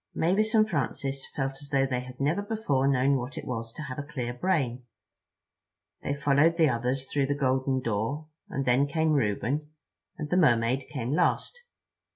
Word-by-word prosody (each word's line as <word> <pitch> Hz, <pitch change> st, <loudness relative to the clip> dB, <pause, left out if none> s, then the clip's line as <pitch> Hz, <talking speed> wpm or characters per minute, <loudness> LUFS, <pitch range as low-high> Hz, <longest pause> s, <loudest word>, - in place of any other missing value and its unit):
Mavis 210 Hz, +7 st, +2 dB
and 215 Hz, 0 st, +5 dB
Francis 140 Hz, -, -2 dB
felt 135 Hz, 0 st, -2 dB
as 145 Hz, -, -9 dB
though 135 Hz, -2 st, +3 dB
they 130 Hz, -2 st, -1 dB
had 125 Hz, 0 st, -9 dB
never 150 Hz, +8 st, +1 dB
before 205 Hz, -11 st, 0 dB
known 135 Hz, 0 st, +3 dB
what 125 Hz, +1 st, -5 dB
it -, -, -5 dB
was 115 Hz, -2 st, -4 dB
to 155 Hz, -, -7 dB
have 130 Hz, -2 st, -6 dB
a -, -, -3 dB
clear 130 Hz, -5 st, -4 dB
brain. 130 Hz, -4 st, 0 dB, 1.2 s
They 140 Hz, -, -2 dB
followed 145 Hz, +4 st, +3 dB
the 160 Hz, -3 st, +5 dB
others 125 Hz, +2 st, -1 dB
through 140 Hz, 0 st, 0 dB
the 145 Hz, -, 0 dB
golden 130 Hz, -1 st, +1 dB
door, 115 Hz, +7 st, -2 dB, 0.2 s
and 135 Hz, -, -2 dB
then 125 Hz, +3 st, +3 dB
came 160 Hz, +2 st, +1 dB
Reuben, 135 Hz, +4 st, 0 dB, 0.5 s
and 150 Hz, -, -4 dB
the 180 Hz, -, +3 dB
Mermaid 130 Hz, -4 st, +3 dB
came 130 Hz, -4 st, -3 dB
last. 175 Hz, -, +1 dB
135 Hz, 180 wpm, -28 LUFS, 125-150 Hz, 1.2 s, and